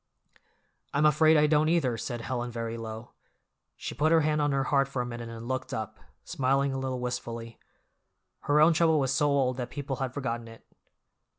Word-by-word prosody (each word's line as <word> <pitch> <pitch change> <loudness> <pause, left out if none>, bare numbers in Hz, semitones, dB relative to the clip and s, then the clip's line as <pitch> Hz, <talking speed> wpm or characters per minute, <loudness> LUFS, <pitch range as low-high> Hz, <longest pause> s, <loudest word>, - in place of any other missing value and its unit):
"I'm 145 +2 +3
afraid 155 +1 +5
I 150 - +5
don't, 150 +1 +3
either," 150 -8 +2
said 120 +1 -5
Helen 120 0 -3
very 115 -1 -4
low. 110 0 -7 0.7
She - - -5
put 155 +2 +1
her 165 -1 +5
hand 150 0 +1
on 145 0 +1
her 135 -1 +1
heart 140 -1 +2
for 135 -2 -5
a 125 - 0
minute 120 -1 -6
and 115 0 -8
looked 130 0 -3
up, 110 0 -5 0.2
smiling 135 -2 0
a 135 - -2
little 130 -1 -3
wistfully. 115 -2 -5 0.9
Her 145 +1 +3
own 160 +2 +6
trouble 160 -1 +3
was 135 -1 +1
so 145 +2 +2
old 130 -3 +1
that 125 -1 -4
people 140 -1 -4
had 130 -2 -2
forgotten 120 -4 -3
it. 115 0 -14
130 Hz, 195 wpm, -28 LUFS, 120-150 Hz, 0.9 s, own